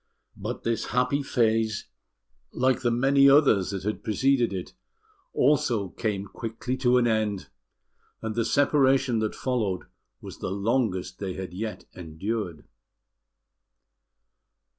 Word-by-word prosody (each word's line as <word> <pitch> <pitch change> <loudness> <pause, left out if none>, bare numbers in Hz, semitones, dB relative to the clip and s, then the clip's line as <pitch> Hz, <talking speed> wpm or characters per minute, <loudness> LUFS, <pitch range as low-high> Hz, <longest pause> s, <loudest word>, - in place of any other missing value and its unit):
But - - -5
this 115 -1 -1
happy 125 +3 +1
phase, 110 -5 +1 0.7
like 130 +1 +1
the 120 - +2
many 135 +4 +4
others 135 -10 +4
that 95 -3 -4
had 105 +2 -3
preceded 125 +2 +2
it, 95 -2 -5 0.6
also 120 -8 +2
quickly 105 +1 -4 0.2
came - - -9
to 125 -1 +4
an 125 - +3
end; 110 -4 0 0.7
and 110 -1 -4
the 115 +1 0
separation 135 -1 +3
that 110 -1 -2
followed 110 -8 -1 0.4
was - - -10
the - - -3
longest 100 -2 -1
they 95 -2 -3
had 95 -1 -7
yet 105 0 -5
endured. 90 0 -5
110 Hz, 120 wpm, -26 LUFS, 100-130 Hz, 0.7 s, many